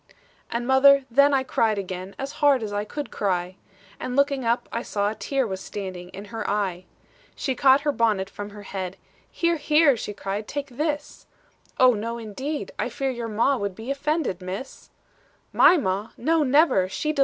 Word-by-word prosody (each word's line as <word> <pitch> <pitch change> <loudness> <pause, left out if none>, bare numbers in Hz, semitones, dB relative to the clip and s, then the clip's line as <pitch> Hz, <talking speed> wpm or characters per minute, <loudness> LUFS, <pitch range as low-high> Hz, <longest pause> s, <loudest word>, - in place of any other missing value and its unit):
"And, 235 +1 -2
mother, 270 +1 +6
then 280 +4 +5
I 270 -1 +2
cried 225 -4 +1
again 185 0 -5
As 270 +1 -4
hard 280 -5 +4
as 205 -1 -4
I 205 0 -1
could 290 +6 -6
cry; 185 -2 -1 0.4
And 250 0 -4
looking 280 -1 +2
up, 235 +1 0
I 230 - -2
saw 205 -3 -1
a - - -4
tear 265 +5 -1
Was 190 -3 -4
standing 185 -3 -6
in 195 +2 -9
her 225 - -3
eye. 190 -3 -1 0.5
"She 265 - -1
caught 265 +2 +5
her 295 0 +1
bonnet 215 -7 +1
from 205 +1 -7
her 205 0 -11
head, 190 -2 -5 0.3
'Here, 340 -1 0
here,' 300 -2 +4
she 210 -2 -5
cried, 200 +2 -4
'take 285 0 -4
this!' 295 -1 -3 0.5
'Oh, 255 -1 +7
no, 230 +2 -3
indeed 260 +7 -5
I - - 0
fear 270 -1 -2
your 235 -2 -4
ma 230 +5 +2
Would 200 -4 -3
be 225 +6 -5
offended, 280 - -1
Miss.' 190 +9 -7 0.6
"'My 360 - +7
ma! 200 - -1
230 Hz, 175 wpm, -24 LUFS, 200-275 Hz, 0.6 s, Oh